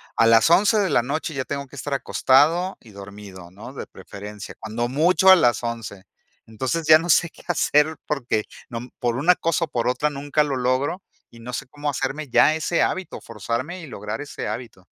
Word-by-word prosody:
a 115 - +4
las 115 +5 +5
11 205 +5 +4
de 200 -3 +1
la 120 - +4
noche 155 +6 -3
ya 130 -2 -3
tengo 140 0 -4
que 135 - -15
estar 140 +1 -3
acostado 155 +8 +2
y 115 - -17
dormido, 100 -2 -11
¿no?, 105 +8 -11
de - - -7
preferencia. 105 0 -10
Cuando 115 +2 -3
mucho 165 +8 +4
a - - +10
las 120 - +2
11. 115 -5 -5 0.4
Entonces, 130 +9 -3
ya 155 0 +8
no 170 +2 -5
sé 175 +1 +4
qué - - -18
hacer 160 -2 +2
porque 125 -7 -1 0.3
no, 115 0 -5
mm, 125 - -11
por 120 -1 0
una 165 +8 +4
cosa 165 0 0
o - - -21
por 120 -4 -2
otra 125 +4 +1
nunca 145 +2 0
lo 140 -3 -2
logro 130 +8 0 0.3
y 115 - -15
no 120 +2 -8
sé 135 - -4
cómo 145 +3 -4
hacerme 135 +2 -3
ya 155 +4 +4
ese 160 +2 0
hábito, 190 -1 -2
forzarme 115 - -5
y - - -8
lograr 105 -5 -6
ese 145 - -6
hábito. 115 -7 -7
135 Hz, 210 wpm, -23 LUFS, 115-155 Hz, 0.4 s, a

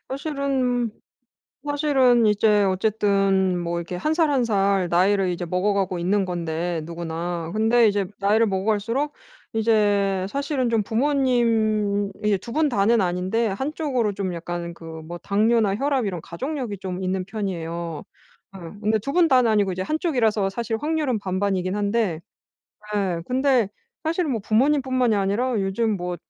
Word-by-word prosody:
사실은 265 -4 -1 0.8
사실은 275 -5 +3
이제 210 0 +3
어쨌든 195 -1 +1
뭐 170 0 -2
이렇게 170 +1 -6
1 305 - 0
살 320 -1 +2
1 270 -3 +2
살 195 -4 +1
나이를 190 +2 +3
이제 175 0 -3
먹어가고 185 +1 0
있는 195 +4 +1
건데 170 -1 -3
누구나. 170 0 -4
근데 225 +2 +4
이제 200 -1 +1
나이를 210 +3 +3
먹어갈수록 215 +8 -1 0.4
이제 205 -4 +2
사실은 280 -2 -1
좀 225 -2 +2
부모님이 225 -5 +1
그 210 -1 +2
2 230 - -9
분 305 0 +2
다는 220 0 +3
아닌데 185 +6 0
한쪽으로 260 0 -1
좀 190 -2 -3
약간 170 0 -5
그 170 - -13 0.2
뭐 170 +2 -7
당뇨나 210 +2 +2
혈압 275 0 0
이런 180 -5 -3
가족력이 245 - -5
좀 185 -1 -5
있는 185 0 -1
편이에요. 170 -6 -4 0.5
예. - - -8 0.2
근데 220 +1 +2
2 275 +7 -4
분 350 0 +4
다는 255 -5 +4
아니고 205 -3 +2
이제 185 - -4
1 310 +11 -1
쪽이라서 225 - +1
사실 225 +2 -3
확률은 300 -6 -1
반반이긴 185 -1 -1
한데 205 -5 0 0.7
예. 185 -5 -1
근데 255 -3 +2 0.4
사실은 325 -1 0
뭐 230 - -1
부모님 265 +8 +2
뿐만이 255 -3 +1
아니라 210 +5 0
요즘 200 +2 0
뭐 180 0 -4
210 Hz, 305 characters per minute, -23 LUFS, 185-245 Hz, 0.8 s, 근데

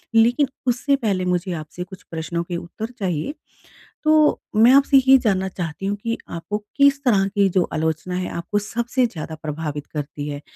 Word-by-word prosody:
लेकिन 240 +5 +4 0.2
उससे 265 +4 +2
पहले 200 -8 -1
मुझे 180 +1 0
आपसे 155 +2 -6
कुछ 185 0 -12
प्रश्नों 165 +1 -3
के 175 0 -4
उत्तर 215 +8 -7
चाहिए। 180 - -2 0.7
तो 310 -1 +4 0.2
मैं 230 +4 +7
आपसे 275 0 +5
ये 270 0 +9
जानना 190 -6 +1
चाहती 175 0 -5
हूँ 200 +1 0
कि 230 0 -1
आपको 170 +5 -4 0.2
किस 280 0 +4
तरह 200 -6 +3
की 200 0 +2
जो 185 -1 +2
आलोचना 160 +3 -1
है, 180 0 -2
आपको 205 +5 -2
सबसे 235 +4 0
ज़्यादा 160 -6 -5
प्रभावित 150 -1 -4
करती 145 -1 -5
है? 145 0 -5
190 Hz, 175 wpm, -22 LUFS, 165-235 Hz, 0.7 s, ये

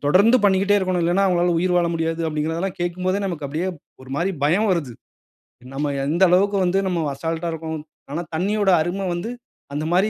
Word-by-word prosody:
தொடர்ந்து 200 - +5
பண்ணிக்கிட்டே 200 +1 +4
இருக்கணும். 185 -2 0
இல்லனா, 180 +4 +2
அவங்களால 175 -1 +2
உயிர் 180 +1 +1
வாழ 175 -1 +3
முடியாது. 165 0 -1
அப்டிங்கிறதலாம் 160 +4 -2
கேட்கும்போதே 185 +3 -1
நமக்கு 170 -6 -4
அப்டியே 160 +6 -2 0.3
ஒரு 130 - -13
மாரி 175 +5 0
பயம் 190 +9 +3
வருது. 160 -9 -1 0.8
நம்ம 145 +2 -1 0.2
எந்த 170 +5 +2
அளவுக்கு 200 +3 +3
வந்து 180 +2 +1
நம்ம 175 -2 0 0.2
அசால்ட்ஆ 165 +3 -2
இருக்கறோம். 160 -1 -5 0.3
ஆனா, 165 +4 -2
தண்ணீயோட 200 +3 +1
அரும 185 +4 -2
வந்து 175 +7 -4 0.4
அந்த 150 +2 -2
மாரி 195 +4 +3
175 Hz, 170 wpm, -22 LUFS, 160-190 Hz, 0.8 s, தொடர்ந்து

